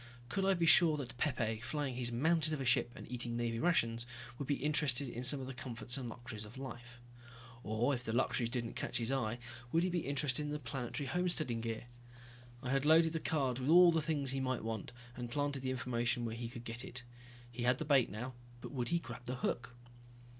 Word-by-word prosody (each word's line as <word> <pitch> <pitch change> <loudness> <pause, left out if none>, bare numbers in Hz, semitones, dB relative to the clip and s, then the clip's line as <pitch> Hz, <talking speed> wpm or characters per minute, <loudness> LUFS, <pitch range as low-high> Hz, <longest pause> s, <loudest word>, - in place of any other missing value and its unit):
Could 195 +5 0
I 195 0 +4
be 170 -1 +1
sure 165 -2 +7
that 130 -5 -5
Pepe, 115 -6 0
flying 135 +2 -2
his 120 -1 -1
mountain 155 +5 +2
of - - -6
a 135 - -2
ship 125 -1 +4
and - - -9
eating 120 -1 -2
Navy 115 -1 -1
rations, 120 -8 +2 0.3
would 140 - -3
be 145 - +2
interested 145 -2 +1
in 120 0 -5
some 135 +3 +3
of 130 - -5
the 135 - -6
comforts 125 -1 -3
and 125 -3 -3
luxuries 120 -2 -7
of 110 +4 -11
life? 120 -2 -8 0.6
Or 110 +6 +1
if 125 -2 -3
the 110 - -2
luxuries 120 0 +1
didn't 120 -2 -2
catch - - -2
his 115 +1 -1
eye, 120 -4 0 0.3
would 165 +1 +3
he 185 - +2
be 175 -4 -1
interested 140 -1 +1
in 150 - -3
the 150 - -2
planetary 140 -1 -4
homesteading 155 -6 0
gear? 115 -1 -3 0.8
I 125 - -2
had 135 0 +2
loaded 160 +2 +5
the 160 - 0
cards 135 -6 0
with 130 - -1
all 175 +1 +9
the 165 -1 +2
things 150 -4 -1
he 135 - -1
might 130 -3 -1
want, 110 -2 -4 0.2
and 120 -1 -5
planted 145 +1 -1
the 130 - -2
information 120 -1 0
where 115 - -3
he 115 0 -4
could 120 -1 -8
get 115 +1 -4
it. 130 -1 -4 0.5
He 120 +1 -6
had 125 +1 +3
the 155 - -3
bait 140 -5 +4
now 125 +6 -5 0.3
but - - -8
would 125 -4 -2
he 170 - +3
grab 120 -7 -7
the 125 +1 -3
hook? 120 0 -2
130 Hz, 225 wpm, -35 LUFS, 120-145 Hz, 0.8 s, all